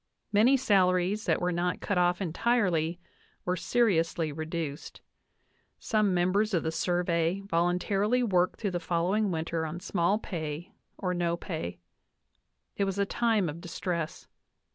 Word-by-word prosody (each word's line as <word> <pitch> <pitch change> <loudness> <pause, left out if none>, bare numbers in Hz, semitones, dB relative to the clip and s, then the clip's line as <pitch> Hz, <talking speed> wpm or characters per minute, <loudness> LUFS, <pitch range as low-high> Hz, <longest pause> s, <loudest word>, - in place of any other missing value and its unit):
Many 235 +7 +5
salaries 195 -3 +2
that - - +2
were 180 0 0
not 175 +1 -1
cut 195 -3 0
off 180 +2 +2
entirely 180 -3 +1 0.5
were 180 - +1
seriously 165 -7 +1
reduced; 160 -1 -5 0.8
some 215 -3 +1
members 185 +4 +2
of 170 - +1
the 160 - -1
Survey 175 +1 0
voluntarily 195 +6 +1
worked 185 -5 +1
through 205 -3 -1
the 175 - -1
following 180 +5 0
winter 165 -1 -2
on 160 +2 -4
small 180 +2 +1
pay 165 -5 -5 0.3
or 180 -1 -1
no 170 -1 0
pay. 155 - -5 1.0
It 200 - +1
was 195 0 -2
a 200 - +2
time 220 -3 +1
of 160 +2 -6
distress. 170 -2 -4
180 Hz, 140 wpm, -29 LUFS, 170-200 Hz, 1.0 s, Many